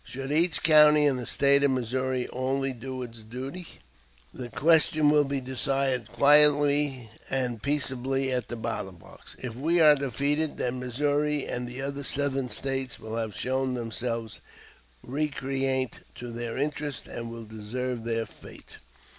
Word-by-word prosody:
Should 135 +2 -5
each 165 +3 +3
county 150 -1 +6
in 140 -3 +2
the 125 - -5
State 140 0 +4
of 140 - +4
Missouri 130 0 -1
only 135 +1 -1
do 130 +1 -6
its 115 -2 -9
duty, 130 +10 -7 0.7
the 125 -1 -7
question 155 +2 +3
will 150 -1 +4
be 140 0 -2
decided 130 -2 -1
quietly 145 -3 +5 0.2
and 125 -4 -1
peaceably 135 -1 -1
at 125 -3 -1
the 120 - -5
ballot 110 -5 -5
box. - - -14
If 125 -3 -5
we 160 +8 +1
are 155 -2 +8
defeated, 140 +3 -1
then 125 0 -2
Missouri 145 +3 0
and 125 0 -3
the 125 +2 -6
other 140 +1 -4
Southern 135 -2 -1
States 135 -1 -3
will 110 0 -6
have 110 -3 -3
shown 130 0 -1
themselves 115 -1 -4 0.6
recreant 135 -2 -2 0.2
to 120 -1 -7
their 120 0 -5
interests 145 -1 -3
and 115 0 -6
will 115 -1 -8
deserve 115 +3 -5
their 115 -1 -1
fate." - - -14
130 Hz, 150 wpm, -27 LUFS, 120-145 Hz, 0.7 s, are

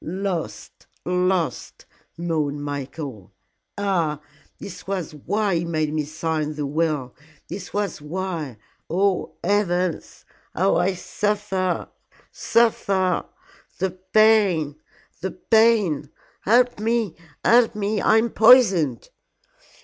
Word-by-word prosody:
"Lost! 185 -1 -5 0.2
Lost!" 180 -5 -1 0.3
moaned 155 -4 -2
Michael. 140 - -6 0.5
"Ah, 175 -7 0 0.4
this 180 -2 -10
was 190 -5 -3
why 200 +7 -1
he 165 - -1
made 155 -3 -1
me 155 -1 -1
sign 155 0 -3
the 150 -1 -3
will 150 -3 -1 0.4
this 180 -4 -7
was 200 -4 -2
why 160 - -4 0.3
oh, 190 +2 0
heavens! 180 -3 -1 0.3
how 190 +4 +2
I 180 +2 +1
suffer 195 -2 -2 0.4
suffer 195 -6 +1 0.5
the 190 0 -1
pain 185 -5 +3 0.5
the 190 - -2
pain. 220 - +2 0.4
Help 245 +2 +3
me 225 -4 0 0.3
help 235 -1 +5
me! 210 0 -1
I 220 - +4
am 225 0 +1
poisoned!" 195 - +5
180 Hz, 105 wpm, -23 LUFS, 155-205 Hz, 0.5 s, help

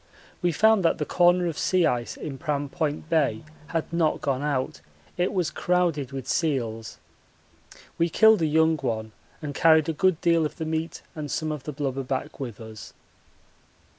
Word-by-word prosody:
We 175 -1 +2
found 220 +4 +4
that 165 - +3
the 150 - -2
corner 175 +2 +3
of 165 -3 -3
sea 185 -2 +2
ice 120 -5 -1
in 135 -4 -6
Pram 145 -3 -2
Point 155 -1 -2
Bay 160 -1 +1 0.2
had 165 0 -3
not 165 -2 +1
gone 135 -2 -1
out 145 -3 -2 0.3
it 180 +1 0
was 180 -4 0
crowded 170 -7 0
with 135 -1 -6
seals. 115 -8 -1 1.0
We 170 +1 +3
killed 220 +2 +5
a 160 - +2
young 160 +1 +3
one 110 -5 -3 0.3
and 145 -1 -4
carried 160 +1 +4
a - - 0
good 185 +1 +2
deal 170 -1 +3
of 150 0 -3
the 160 - -4
meat 160 +1 -3
and 150 -2 -6
some 155 +1 -2
of 150 -4 -6
the 150 - -3
blubber 135 -2 -3
back 130 +2 -4
with 120 -6 -6
us. 110 -3 -10
155 Hz, 180 wpm, -25 LUFS, 135-170 Hz, 1.0 s, killed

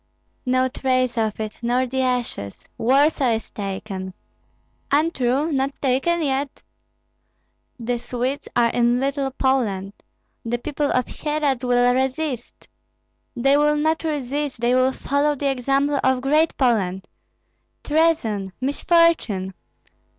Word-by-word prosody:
No 255 0 +3
trace 255 -1 0
of 220 -2 -1
it, 215 -1 -5
nor 245 +2 +1
the 260 +1 -2
ashes! 245 - -2
Warsaw 270 0 +3
is 220 - -7
taken! 190 -2 -5 0.7
Untrue, 285 -1 +1
not 275 0 -1
taken 285 +6 +1
yet! 275 -1 -2 1.1
The 240 0 -2
Swedes 250 +3 -3
are 235 -1 +3
in 240 0 +2
Little 275 0 -1
Poland! 230 -8 0 0.5
The 235 +1 -1
people 290 +3 -2
of 255 -1 +1
Syeradz 295 -4 -2
will 245 0 +3
resist! 265 0 -3 0.7
They 275 +3 +3
will 300 0 +3
not 315 +2 0
resist, 290 -3 -2
they 240 +1 +2
will 255 +1 +3
follow 285 +3 0
the 280 0 0
example 275 +2 +1
of 260 -1 +2
Great 305 +4 +2
Poland! 195 -8 +1 0.8
Treason! 295 - +1
misfortune! 280 - +2
260 Hz, 120 wpm, -22 LUFS, 240-285 Hz, 1.1 s, No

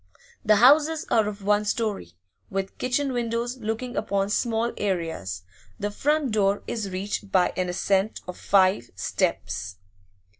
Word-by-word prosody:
The 215 -2 +5
houses 295 +7 +5
are 220 -2 +4
of 205 -1 -6
one 205 +1 +3
storey, 205 - -2 0.4
with 195 0 -4
kitchen 260 +2 0
windows 240 +1 -2
looking 230 +2 -4
upon 200 -1 0
small 230 +1 0
areas; 165 - -2 0.4
the 205 +1 -2
front 295 +3 +1
door 205 -1 +1
is 215 -4 -3
reached 195 +1 -4
by 185 -2 +3
an 180 -1 -1
ascent 195 +3 0
of 180 - -6
five 185 -11 +2
steps. 95 0 -2
210 Hz, 140 wpm, -25 LUFS, 190-235 Hz, 0.4 s, The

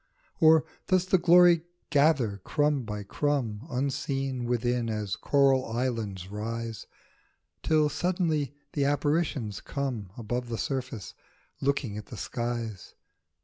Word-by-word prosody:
Or 160 -1 +6 0.2
does 185 -1 +3
the 185 0 +3
glory 175 -1 +6 0.3
gather 140 -8 +3
crumb 145 -2 +1
by 105 -1 -4
crumb 125 0 -1
Unseen, 135 -1 -2
within, 120 0 0
as 105 -3 -2
coral 135 -2 +3
islands 115 -6 -3
rise, 115 +1 -4 0.7
Till 155 -1 +3
suddenly 155 -2 0 0.2
the 145 - +1
apparitions 145 - 0
come 125 -9 -3
Above 120 +1 -3
the 115 - -2
surface, 125 -8 -4 0.5
looking 135 -6 0
at 105 - -11
the 115 - -9
skies 115 -2 -4
130 Hz, 115 wpm, -28 LUFS, 115-145 Hz, 0.7 s, Or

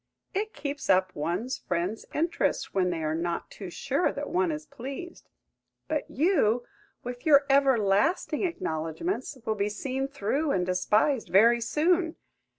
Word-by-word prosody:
It 425 +3 -2
keeps 285 -1 -5
up 185 -1 +3
one's 180 - -2
friends' 180 +5 -3
interest 330 +3 0
when 185 -2 +2
they 165 -2 -2
are 155 0 0
not 170 +1 -3
too 195 -3 -8
sure 275 - 0
that 290 0 -5
one 355 -1 +2
is 305 0 -5
pleased. 280 +6 -8 0.6
But 305 -1 -2
you, 255 - +2 0.4
with 245 0 -6
your 285 -2 +6
everlasting 270 - +3
acknowledgments, 260 - -3
will 220 - +1
be 205 -1 -1
seen 265 +5 -3
through, 275 +3 -1
and 180 -1 +1
despised 210 +8 +1
very 235 +5 +5
soon.! 325 +7 +1
255 Hz, 145 wpm, -28 LUFS, 195-300 Hz, 0.6 s, your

